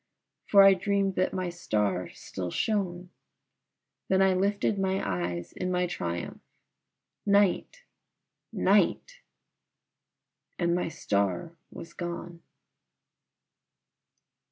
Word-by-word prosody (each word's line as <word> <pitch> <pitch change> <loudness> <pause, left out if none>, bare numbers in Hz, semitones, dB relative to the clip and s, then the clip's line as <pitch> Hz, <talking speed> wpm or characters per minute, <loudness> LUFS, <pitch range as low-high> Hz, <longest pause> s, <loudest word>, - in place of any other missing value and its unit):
for 200 -1 +7
I 195 0 +8
dreamed 195 +1 0
that 185 - +2
my 185 -2 -3
star 105 - -1
still 90 -2 -6
shone, 180 - -2 1.0
Then 190 - +2
I 190 -1 +4
lifted 200 +2 0
my 190 0 0
eyes 90 -2 -3
in 185 - -3
my 180 0 +1
triumph. 85 - -4 0.8
Night! 205 - +2 0.7
night! - - +2 1.4
and 170 -1 +1
my 180 -1 0
star 100 - -1 0.2
was 165 - -10
gone. 170 -1 -6
180 Hz, 95 wpm, -28 LUFS, -, 1.4 s, I